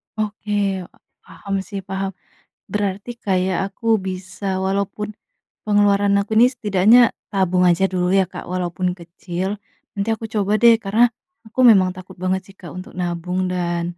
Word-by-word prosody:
Oke, 215 -1 -4 0.7
paham 200 -1 -6
sih, 200 - -5
paham, 195 0 -2 0.6
berarti 205 +1 -2
kayak 185 -2 +1
aku 215 +3 -11 0.2
bisa 185 +1 -4
walaupun, 200 +2 -2 0.5
pengeluaran 205 -1 +3
aku 200 +2 -5
ini 235 +3 +7
setidaknya 215 -2 +4 0.3
tabung 185 -2 +2
aja 175 +2 +3
dulu 180 -1 0
ya 195 0 +4
Kak - - -9
walaupun 180 0 -2
kecil. 180 +3 -5 0.3
Nanti 200 +1 -2
aku 225 - -9
coba 205 -1 +1
deh 235 -1 +8
karena 215 +5 +4 0.4
aku 220 +4 -4
memang 190 -4 +5
takut 185 0 -11
banget 185 +1 +1
sih 195 - -16
Kak 175 -5 -9
untuk 185 - -8
nabung 180 +1 -2
dan, 175 -1 -1
195 Hz, 145 wpm, -21 LUFS, 185-205 Hz, 0.7 s, deh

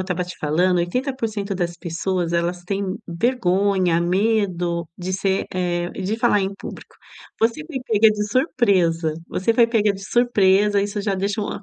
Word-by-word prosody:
estava 180 -1 -2
te 180 - -9
falando, 175 +4 +2
80% 215 +1 -2
das 175 -2 -2
pessoas 170 0 -2
elas 175 +1 -1
têm 195 0 -2
vergonha, 190 -3 +1
medo 180 -3 0
de 185 +1 -4
ser, 190 0 0
eh, 175 -1 -1
de 195 +3 -3
falar 230 -3 +3
em 195 0 -2
público. - - -10 0.4
Você 230 +7 0
foi 315 -3 -8
pega 220 0 +5
de 210 -1 -2
surpresa, 190 - +1
você 225 +5 0
foi 235 0 +5
pega 215 -3 +2
de 195 0 -9
surpresa, 205 -3 +3
isso 205 +1 -3
já 200 -1 -1
deixa, 200 +3 -1
ah, 205 - -4
195 Hz, 160 wpm, -22 LUFS, 175-215 Hz, 0.4 s, pega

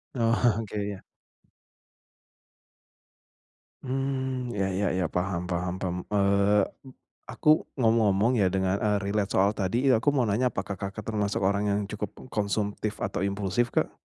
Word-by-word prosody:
Oke, 115 -3 +1
ya. 100 -2 -7 2.8
Mmm, 130 -2 -2
ya 95 -1 0
ya 95 +1 0
ya, 95 -2 0
paham 90 +1 -2
paham 90 0 -1
paham, 90 -2 -2 0.2
eee, 100 +1 +3 0.7
aku 155 +1 +3 0.2
ngomong-ngomong 110 -1 +3
ya, 100 - +3
dengar, 95 0 +1
eee, 105 0 +1
relate 100 0 -1
soal 100 +2 +4
tadi, 115 +8 +1
eee, 130 - +6
aku 125 +6 +2
mau 135 - +2
nanya, 120 +4 +1
apakah 95 0 -4
Kakak 100 +2 -5
termasuk 105 -2 -1
orang 100 +1 0
yang 100 0 +1
cukup 105 -1 -5 0.2
konsumtif 105 0 -1
atau 100 0 -1
impulsif 100 +4 -1
Kak? - - +1
100 Hz, 135 wpm, -27 LUFS, 95-115 Hz, 2.8 s, eee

